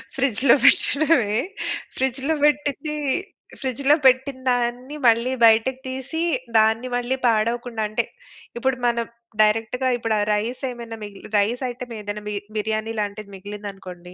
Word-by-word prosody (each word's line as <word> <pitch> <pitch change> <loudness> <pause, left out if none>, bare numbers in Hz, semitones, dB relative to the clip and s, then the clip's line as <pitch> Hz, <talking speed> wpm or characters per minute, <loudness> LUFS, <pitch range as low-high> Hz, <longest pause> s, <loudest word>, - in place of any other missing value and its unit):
ఫ్రిడ్జ్‌లో 265 -1 +4
పెట్టడమే. 280 -9 +4 0.6
ఫ్రిడ్జ్‌లో 265 +3 0
బెట్టింది, 295 0 +1 0.7
ఫ్రిడ్జ్‌లో 270 +3 +2
పెట్టిన 260 +1 +4
దాన్ని 245 +3 -2
మళ్ళీ 235 +2 +3
బయటకి 225 +4 +4
తీసి, 265 +5 -4 0.4
దాన్ని 220 +3 +3
మళ్ళీ 245 +2 0
పాడవకుండా 230 +1 0
అంటే 215 +2 -1 0.5
ఇప్పుడు 265 +2 +1
మనం 235 -1 +1 0.4
డైరెక్ట్‌గా 225 +4 +2
ఇప్పుడు 225 -2 -1
ఆ - - +1
రైసేమైనా 235 +1 -4
మిగిలి 205 -1 -10
రైస్ 230 +6 +1
ఐటెమేదైనా 225 -4 -6
మి 210 - -3 0.2
బిర్యానీ 220 +1 -2
లాంటిది 205 0 -4
మిగిలిందనుకోండి! 195 -3 -9
235 Hz, 115 wpm, -23 LUFS, 215-260 Hz, 0.7 s, ఫ్రిడ్జ్‌లో